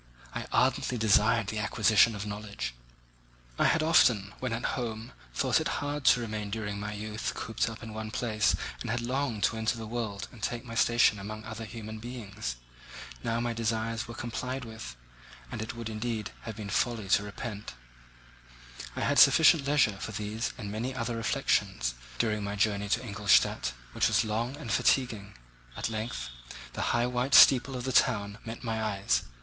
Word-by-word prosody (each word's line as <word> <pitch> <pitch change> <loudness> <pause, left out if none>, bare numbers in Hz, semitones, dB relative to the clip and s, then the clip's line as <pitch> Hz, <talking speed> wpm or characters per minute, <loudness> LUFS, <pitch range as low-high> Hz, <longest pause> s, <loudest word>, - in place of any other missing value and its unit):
I - - -4
ardently 125 - +2
desired 110 +1 +4
the 105 +1 -3
acquisition 110 +1 +4
of 100 0 -5
knowledge. 105 -8 -5 0.9
I - - +4
had 160 - +3
often, 110 -11 +4
when 130 -2 -2
at 115 +1 -2
home, 115 -2 -4 0.2
thought - - +2
it - - -1
hard 145 -1 -3
to 125 - +6
remain 110 -3 -4
during 105 -1 -3
my 105 +1 -4
youth 105 +1 -4
cooped 115 +1 -1
up 115 0 -9
in 110 -1 -7
one 110 0 -5
place 110 -3 +1 0.2
and - - -5
had 120 +2 0
longed 125 -3 -1
to 115 - +2
enter 110 +1 0
the 115 - -6
world 110 -3 -4
and 120 - -14
take 115 +3 -3
my 115 - -8
station 115 -2 +4
among 110 +2 -6
other 110 +1 -6
human 110 0 -7
beings. 110 - -5 0.7
Now 115 0 0
my 120 0 -1
desires 115 0 -1
were 120 - -8
complied 125 +2 -4
with, 110 - -8 0.6
and - - -4
it 110 - -5
would, 115 -1 -5
indeed, 110 -1 -3
have 110 -2 -5
been 105 -2 -6
folly 115 -2 0
to 105 - +5
repent. 105 - -6 1.2
I - - -3
had - - +3
sufficient 160 -3 +7
leisure 140 -9 +3
for 110 - -5
these 110 +3 -3
and 105 -4 -6
many 120 +5 -3
other 115 -1 -2
reflections - - 0 0.2
during 105 - 0
my 100 0 -3
journey 100 -1 +1
to 115 +5 +1
Ingolstadt, 100 - +3 0.2
which - - +2
was - - +2
long 115 +5 -2
and 135 -7 -6
fatiguing. 110 -7 +1 0.4
At - - -1
length 110 - -4 0.4
the - - -4
high 120 0 +2
white 125 +2 +1
steeple 130 0 +7
of 125 - -5
the 130 - -1
town 105 -4 +2
met 115 +2 -7
my 110 -2 -2
eyes. 95 - 0
110 Hz, 180 wpm, -29 LUFS, 105-120 Hz, 1.2 s, sufficient